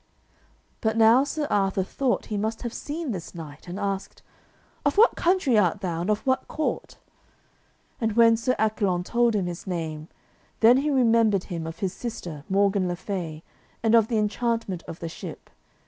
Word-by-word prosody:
But 220 0 0
now 230 +4 +6
Sir 295 +1 -2
Arthur 195 -1 +1
thought 255 +6 -1
he - - 0
must 220 +3 -3
have 235 -1 -4
seen 300 -1 -4
this 180 -3 -6
knight, 155 -1 -10
and 180 +3 -5
asked, 195 -1 -4 0.6
"Of 285 +2 +1
what 455 +3 +6
country 335 - +3
art 195 +1 +1
thou, 170 -4 -2
and 180 - -2
of 210 0 0
what 260 -1 +1
court?" 310 - -3 1.0
And 225 -2 0
when 230 0 +6
Sir 235 +3 0
Accolon 205 -5 +1
told 235 +3 +2
him 195 -3 0
his 175 +1 -6
name, 160 -4 -4 0.5
then 235 +3 +7
he 290 +3 0
remembered 230 -7 +3
him 170 -4 -5
of 165 0 -7
his 190 -2 -1
sister, 170 -11 -6
Morgan 195 -1 +2
le 175 - -2
Fay, 175 -4 -5 0.4
and 225 0 +3
of 225 -2 +6
the 230 - 0
enchantment 215 -3 -1
of 165 - -8
the 165 - -3
ship. 165 - -9
210 Hz, 180 wpm, -25 LUFS, 180-235 Hz, 1.0 s, then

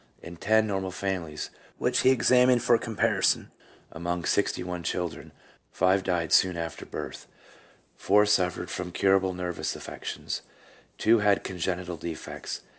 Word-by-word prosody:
In 85 +1 -8
ten 110 +4 +3
normal 95 -3 -2
families, 90 -5 -4 0.3
which - - +1
he 130 - +5
examined 125 -1 +4
for 120 0 +5
com 115 -1 -6
parison, - - +2 0.4
among 85 +1 -3
sixty 100 -2 +1
one 90 -1 -4
children, 85 0 -4 0.4
five 95 +1 +3
died 85 -3 0
soon 90 -2 +4
after 85 0 -5
birth; - - -7 0.7
four 105 +1 +4
suffered 90 -4 +1
from 90 -1 -4
curable 95 0 +2
nervous 90 -1 -3
affections; - - -5 0.6
two 115 +1 +4
had 105 -1 +3
congenital 90 -1 -3
defects. 80 0 -6
95 Hz, 135 wpm, -27 LUFS, 85-105 Hz, 0.7 s, he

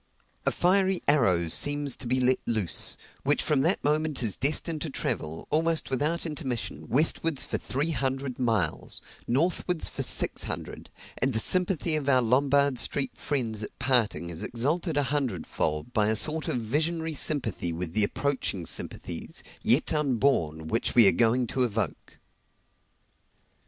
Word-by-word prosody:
A - - +4
fiery 190 +1 +1
arrow 95 - +3
seems 145 - +1
to 125 - -6
be 130 +2 +1
let 130 0 +2
loose, 110 -7 +3 0.2
which 145 +2 +1
from 150 -4 +1
that 170 +7 +1
moment 150 -2 0
is 110 -4 0
destined 155 +3 0
to 160 - -3
travel, 80 - -3
almost 160 -1 0
without 150 +7 0
intermission, 135 -7 -5
westwards 150 +3 +2
for - - -3
three 145 +5 -2
hundred 135 -1 -3
miles 110 -10 -1 0.2
northwards 165 +5 0
for - - -5
six - - +1
hundred; - - -6 0.3
and 130 +2 0
the 110 - +1
sympathy 180 - +1
of 145 -2 -2
our 130 -2 +3
Lombard 140 +2 +2
Street 135 -2 0
friends 115 -7 -3
at 105 - -8
parting 120 -9 +1
is 85 - -6
exalted 150 +7 -1
a 145 - +3
hundred 125 - -2
fold 75 +10 -3
by 105 -2 +2
a 110 - +1
sort 155 +8 +3
of - - -1
visionary 160 +8 -1
sympathy 125 - 0
with 85 0 -4
the 110 - +5
approaching 105 -6 -2
sympathies, - - -4 0.2
yet 130 +7 +3
unborn, 120 - 0
which 115 +8 -1
we 115 -4 +8
are - - +6
going 120 +2 +2
to 130 +3 -1
evoke. 110 -2 -3
135 Hz, 155 wpm, -27 LUFS, 110-150 Hz, 0.3 s, we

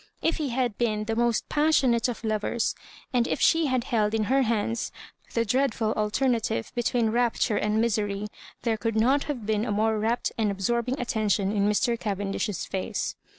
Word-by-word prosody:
If 325 - 0
he 300 -3 -2
had 240 -3 -1
been 215 -3 0
the 225 +1 -2
most 235 -1 +1
pas 305 +1 +2
sionate 240 -2 +2
of 240 - -5
lovers, 220 +1 0 0.4
and 240 -1 +2
if - - -1
she 325 -1 +4
had 255 -2 +1
held 220 -4 +1
in 220 - +1
her 265 +6 +2
hands 230 -1 -1 0.4
the 230 0 +2
dreadful 230 -2 +1
alternative 220 - 0
between 240 -2 +1
rapture 235 -2 +1
and 210 +1 +1
misery, 210 -3 0 0.4
there 230 -2 +1
could 225 +1 -2
not 260 +6 +3
have 255 -8 -4
been 215 0 0
a 225 - -2
more 215 +1 +1
rapt 230 +3 0
and 215 -2 +2
absorbing 235 +7 -1
attention 215 -5 0
ui 210 - -1
Mr. 210 +4 +2
Cavendish's 200 -2 -2
face. 190 - -3
225 Hz, 180 wpm, -26 LUFS, 210-245 Hz, 0.4 s, she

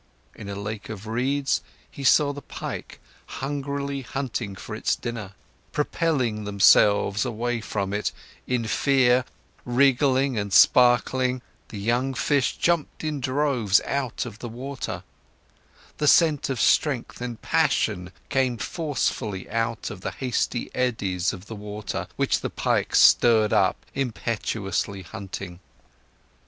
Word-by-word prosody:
In 100 - -9
a 100 - -4
lake 105 +1 -6
of 105 -2 -7
reeds, 135 +5 0 0.3
he 140 - -8
saw 145 +2 +4
the 145 - -8
pike - - -7 0.3
hungrily 140 0 -3
hunting 120 -5 -4
for - - -8
its - - 0
dinner; 110 -5 -6 0.4
propelling 140 -8 0
themselves 100 0 +4
away 120 -1 -2
from 100 -2 -3
it, 105 +1 -1 0.4
in 125 -2 0
fear, 130 +1 +3 0.4
wiggling 130 0 +3
and 100 -1 -3
sparkling, 125 +2 +4 0.2
the 105 - -8
young 120 +6 0
fish 140 0 +1
jumped 170 -3 0
in 155 -2 -2
droves 130 -6 +2
out 135 -3 -2
of 105 - -9
the 120 - -6
water; 130 +4 -5 1.0
the 150 - +1
scent 155 -3 +4
of 130 -4 -2
strength 130 -3 +1
and 120 -2 -6
passion 90 0 +1 0.2
came 130 -3 +1
forcefully 115 - -2
out 115 +1 -2
of 100 -3 -9
the - - -3
hasty 125 -2 -2
eddies 100 -8 0
of 95 +1 -9
the 110 - -8
water, 105 0 -5
which - - +1
the - - -3
pike - - 0
stirred 110 -3 +6
up, - - +2
impetuously 110 -6 -2
hunting. 90 +1 -7
120 Hz, 130 wpm, -25 LUFS, 105-135 Hz, 1.0 s, stirred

